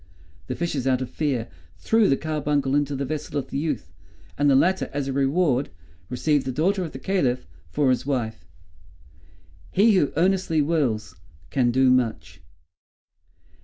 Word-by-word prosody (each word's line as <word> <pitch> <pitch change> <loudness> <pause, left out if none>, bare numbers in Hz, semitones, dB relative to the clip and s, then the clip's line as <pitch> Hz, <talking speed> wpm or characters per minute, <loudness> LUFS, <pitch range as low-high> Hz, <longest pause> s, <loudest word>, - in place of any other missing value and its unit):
The - - -3
fishes, 150 -6 -2
out 130 0 +2
of 130 - -8
fear, 135 -7 -1 0.3
threw 225 - +3
the 135 - +3
carbuncle 150 -3 -1
into 145 0 +1
the 140 +1 -2
vessel 150 +1 -4
of 140 - -4
the - - -1
youth; 140 - -3 0.4
and 145 0 +2
the 135 - +5
latter, 185 +7 +2
as 140 -1 -3
a 135 - -2
reward, 140 0 +1 0.4
received 145 +2 0
the - - 0
daughter 185 +8 +1
of 165 - -5
the - - -7
Caliph 130 -7 0 0.2
for 145 -3 +2
his 125 -1 0
wife." 120 -8 -2 1.3
"He 215 +4 +5
who 180 -7 +2
earnestly 185 -2 +2
wills, 135 - 0 0.4
can 125 -3 +2
do 130 +1 +4
much!" 125 -3 -1
140 Hz, 160 wpm, -24 LUFS, 130-155 Hz, 1.3 s, the